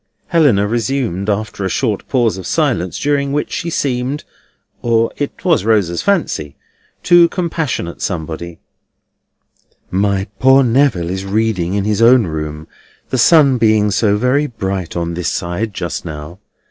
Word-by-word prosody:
Helena 145 - +3
resumed, 115 -4 -1
after 105 -1 -2
a 95 - -1
short 110 -3 -1
pause 120 -6 +1
of 95 -2 -7
silence, 90 +1 0
during 140 -1 0
which 145 +1 -2
she 170 - -3
seemed 135 -1 -2 0.6
(or 115 -1 +1
it 145 +5 -5
was 165 - +3
Rosa's 100 -6 +1
fancy) 160 - -1 0.5
to 175 -1 +6
compassionate 160 - -3
somebody: 85 -1 -4 1.3
"My 100 0 0
poor 130 +1 +5
Neville 115 -9 +2
is 95 +1 -3
reading 100 -3 -1
in 100 - 0
his 105 +1 0
own 120 0 +6
room, 75 -1 -5 0.4
the 130 - 0
sun 140 -1 +5
being 110 -2 +3
so 105 -1 +2
very 130 +6 +1
bright 95 - -4
on 85 0 -2
this 85 -1 -2
side 90 +6 -3
just 85 -3 -4
now. 80 +2 -8
110 Hz, 145 wpm, -16 LUFS, 90-135 Hz, 1.3 s, to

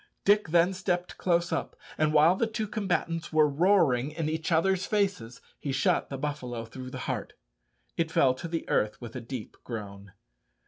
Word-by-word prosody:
Dick 205 -1 +4
then 170 +3 +3
stepped 180 -1 -2
close 170 -1 +1
up, - - -2 0.2
and 155 -1 +2
while 155 +3 +5
the 230 - +1
two 220 -1 -3
combatants 175 -5 -2
were 155 -1 +5
roaring 145 -5 +3
in 155 0 -3
each 160 +1 -2
other's 185 +3 +2
faces, 195 - -1 0.2
he 140 - -3
shot 135 - +1
the 135 - -4
buffalo 130 -5 -4
through 130 +3 -8
the - - -7
heart. - - -3 0.6
It 165 -1 +1
fell 135 -4 +4
to 130 +6 -7
the 165 0 -4
earth 105 0 0
with 120 -1 -9
a 130 - -4
deep 120 -1 -7
groan. 100 -4 -7
155 Hz, 180 wpm, -28 LUFS, 130-180 Hz, 0.6 s, while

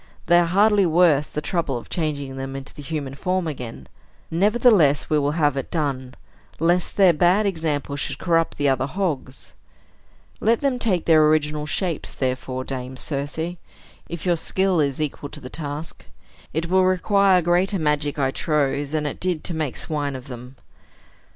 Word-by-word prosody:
They 175 - +5
are 175 - +2
hardly 200 +2 +4
worth 160 -3 +3
the 150 - -2
trouble 160 -7 -1
of 120 - -9
changing 145 -5 -3
them 135 0 -5
into 135 0 -6
the - - -10
human 145 -2 -4
form 185 +4 -1
again. 120 - -6 0.5
Nevertheless, 195 - +3
we 155 - +4
will 145 0 0
have 150 -4 +2
it 135 - -4
done, 135 -5 -2 0.4
lest 175 +2 +1
their 190 -4 +6
bad 180 +6 +3
example 155 -6 -2
should 140 -1 -4
corrupt 165 0 +1
the 145 - +1
other 135 0 +1
hogs. 150 -6 -4 0.9
Let 230 +1 +2
them 270 -3 0
take 190 -8 +1
their 155 -2 +5
original 150 -1 +1
shapes, 170 0 -3
therefore, 130 0 -2
Dame 130 -1 -6
Circe, 160 +6 -4 0.5
if 170 -1 -6
your 175 -2 +2
skill 190 +1 +1
is 140 -2 0
equal 150 -1 -3
to 150 - -9
the 125 -3 -10
task. 150 0 -6 0.5
It 165 +2 -2
will 185 +2 +3
require 185 0 +3
greater 180 +4 +2
magic, 150 -2 0
I 135 -2 +1
trow, 145 -2 0
than 150 +1 -2
it 145 - -4
did 180 -4 -2
to 175 - -3
make 155 -5 -3
swine 145 -3 -3
of 130 +1 -9
them." 125 +1 -9
155 Hz, 170 wpm, -23 LUFS, 140-175 Hz, 0.9 s, their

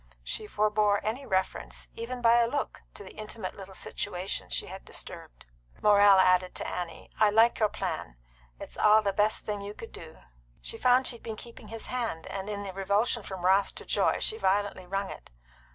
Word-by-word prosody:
She 210 - -3
forbore 210 -1 +2
any 240 +6 -3
reference, 190 -2 -2
even 240 +2 -6
by 235 +1 +6
a 235 - +4
look, 285 +3 -3
to - - -9
the 190 - -12
intimate 215 -3 -6
little 195 -1 -10
situation 185 -1 -4
she - - -1
had - - -9
disturbed. - - -9 0.3
Morrell 205 -1 +7
added 185 -1 +4
to - - -4
Annie: 175 -2 -5
"I 215 -1 +6
like 225 +3 +4
your 215 -2 +3
plan. - - -4 0.4
It's - - -9
the 210 -1 +5
best 210 +1 +2
thing 205 -1 -3
you 205 +1 -7
could 225 - -9
do." 160 -1 -11 0.4
She 225 - -6
found 255 +1 +4
she 240 - +1
had - - -26
been 225 -1 -5
keeping 235 +2 -11
his 225 0 -5
hand, 230 -10 -3
and 195 +1 -5
in 205 -1 -3
the 195 -2 -6
revulsion 200 +5 +1
from 190 -3 -6
wrath 195 +2 +3
to - - -9
joy - - +2
she 440 - -1
violently 195 -1 0
wrung 195 +1 -2
it. - - -11
205 Hz, 195 wpm, -29 LUFS, 190-225 Hz, 0.4 s, Morrell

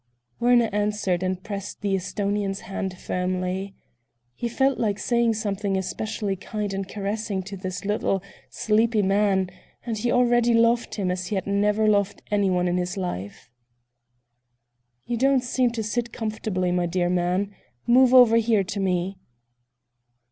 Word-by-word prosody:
Werner 240 -1 +4
answered 205 -3 0
and 185 0 -2
pressed 200 -1 -6
the 200 -1 0
Esthonian's 195 +1 -2
hand 190 -1 -4
more 185 - -15
firmly. 185 +1 -2 0.6
He 235 - -3
felt 265 +2 +1
like 205 -3 0
saying 235 +2 +1
something 200 -2 -1
especially 200 +1 -3
kind 205 +1 -4
and 195 0 -4
caressing 205 -1 -3
to 195 +2 -7
this 185 -1 -5
little, 195 -2 0 0.3
sleepy 220 0 +2
man, 195 -1 +2 0.3
and 225 -3 -3
he 240 +2 0
already 240 -1 +3
loved 230 +1 +2
him 190 -4 -1
as 180 0 -3
he 210 - -2
had 190 - -2
never 210 +2 +2
loved 200 -2 +1
anyone 190 -3 +2
in 175 0 +1
his 180 +2 -2
life. 100 - -5 1.5
"You 240 - -2
don't 265 +1 +3
seem 250 0 +1
to 225 -2 -2
sit 235 +2 -2
comfortably, 215 -5 -2
my 175 -1 +1
dear 175 +1 0
man. 180 +3 0 0.3
Move 250 +1 +5
over 245 -3 +7
here, 225 -3 +3
to 200 +2 -5
me." 185 0 -1
200 Hz, 150 wpm, -24 LUFS, 185-225 Hz, 1.5 s, over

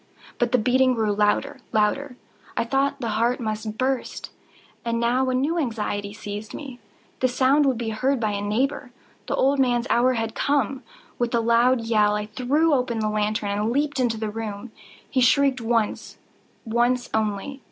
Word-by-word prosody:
But 240 -1 +1
the 250 - +4
beating 255 +2 +3
grew 215 -2 +1
louder, 210 0 +1
louder! 250 +5 0 0.4
I - - +2
thought 275 +3 0
the 230 - -2
heart 240 +2 +1
must 215 -1 -4
burst. 260 0 -2 0.5
And 230 -1 -1
now 250 +3 +1
a 255 - 0
new 300 +7 0
anxiety 210 -6 -2
seized 210 +1 -7
me—the 255 -2 -6
sound 270 +3 +3
would 260 -3 +1
be 230 -1 -3
heard 255 +5 0
by 215 -2 0
a 200 0 -3
neighbour! 250 +6 -1 0.4
The - - 0
old 275 +1 +2
man's 245 -2 +2
hour 250 +2 +4
had 225 -2 -2
come! 275 -2 0 0.4
With 240 0 0
a - - +3
loud 235 +2 +3
yell, 215 -2 +2
I 210 0 -2
threw 270 +9 +1
open 250 -3 0
the 215 -1 0
lantern 210 -1 -1
and 210 +2 0
leaped 285 +1 0
into 240 -3 +1
the 215 -1 -3
room. 220 +1 -6 0.4
He 260 - 0
shrieked 265 +1 +3
once—once 235 +2 -2
only. 220 +5 -2
235 Hz, 170 wpm, -24 LUFS, 215-260 Hz, 0.5 s, the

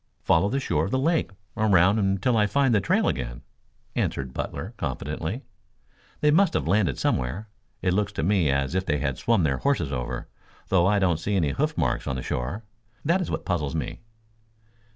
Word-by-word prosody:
"Follow 85 +5 +3
the 135 - 0
shore 135 - 0
of - - -3
the 130 - +1
lake 160 +5 +1 0.3
around 100 -1 +4
until 100 +4 +1
I 105 -2 +3
find 135 +2 +2
the 105 - +3
trail - - +2
again," - - -3 0.5
answered 65 -2 -2
Butler - - -5
confidently. 80 - -4 0.8
"They 150 - +4
must 180 +2 +4
have - - 0
landed 90 - +2
somewhere. 70 - -1 0.3
It 90 -1 +2
looks 105 +1 0
to 70 - -2
me 90 -4 +2
as 70 +2 0
if 95 0 +1
they 75 -5 0
had 70 -3 -2
swum 115 -6 +2
their 70 -4 +1
horses 135 - 0
over, 60 -2 -4 0.4
though 90 -2 +4
I 105 +1 +3
don't 90 -5 +2
see 100 +5 -1
any 80 -7 +2
hoof - - -1
marks - - 0
on 65 - -1
the 65 - -4
shore. 70 - -3 0.4
That 170 +5 +3
is 180 - -3
what - - -3
puzzles 75 -8 -1
me." - - -3
95 Hz, 195 wpm, -25 LUFS, 75-110 Hz, 0.8 s, around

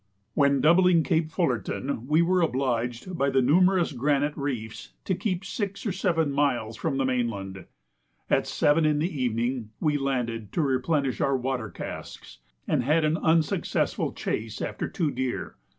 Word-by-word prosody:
When 140 -2 +3
doubling 170 +1 +5
Cape 160 -2 +1
Fullerton, 130 - -2
we 155 +3 +4
were 180 +1 +2
obliged, 125 +2 -1
by 140 -3 +1
the 135 -1 +2
numerous 180 +5 +4
granite 145 +2 0
reefs, 125 -6 -5
to 190 - 0
keep 185 0 -2
six 200 0 -4
or 205 - 0
seven 165 -5 0
miles 125 -6 0
from 135 - -2
the 135 - +1
mainland. 105 -7 -2 0.6
At - - +1
7 150 +2 +2
in 155 -1 +3
the 150 -2 -2
evening 120 -1 -1
we 150 -2 +1
landed 115 -6 -2
to - - +1
replenish 135 0 0
our 135 -1 +2
water 125 -3 -2
casks, 60 - -8 0.3
and 150 - +2
had 155 +5 +2
an 155 +1 +2
unsuccessful 160 -2 +1
chase - - -4
after - - -3
two 155 -4 -1
deer. 130 -2 -3
140 Hz, 155 wpm, -26 LUFS, 125-165 Hz, 0.6 s, doubling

